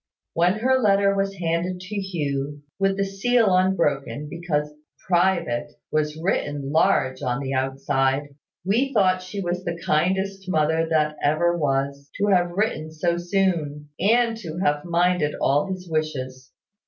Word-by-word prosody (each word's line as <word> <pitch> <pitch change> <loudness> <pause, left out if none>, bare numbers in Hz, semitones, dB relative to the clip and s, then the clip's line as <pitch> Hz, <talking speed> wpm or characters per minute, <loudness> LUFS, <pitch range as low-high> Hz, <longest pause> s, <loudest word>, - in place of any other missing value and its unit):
When 175 +2 +3
her 260 +5 +2
letter 200 -3 +3
was 195 0 -1
handed 175 +1 -1
to 190 +3 -7
Hugh, 145 -7 -3 0.2
with 195 0 +1
the 200 - +1
seal 200 +1 +2
unbroken, 150 -6 0
because 150 -3 -2 0.3
`private' 175 -9 +1 0.2
was 150 0 0
written 145 -5 -1
large 155 -5 +2
on 125 +1 -1
the 135 -1 -3
outside, 135 +1 0 0.4
we 240 +8 +1
thought 185 -3 +3
she 190 +2 -6
was 180 0 -2
the 170 -1 -4
kindest 190 +4 0
mother 160 -1 +2
that 150 -1 +1
ever 170 +4 +2
was, 140 -2 -1
to 205 - +1
have 175 -2 +3
written 175 -4 -1
so 170 +2 -1
soon, 175 -5 -1
and 230 +4 +3
to 170 -7 -7
have 150 -4 0
minded 175 -3 +1
all 145 +7 +2
his 185 -1 -5
wishes. 130 -5 -3
170 Hz, 145 wpm, -24 LUFS, 150-190 Hz, 0.4 s, When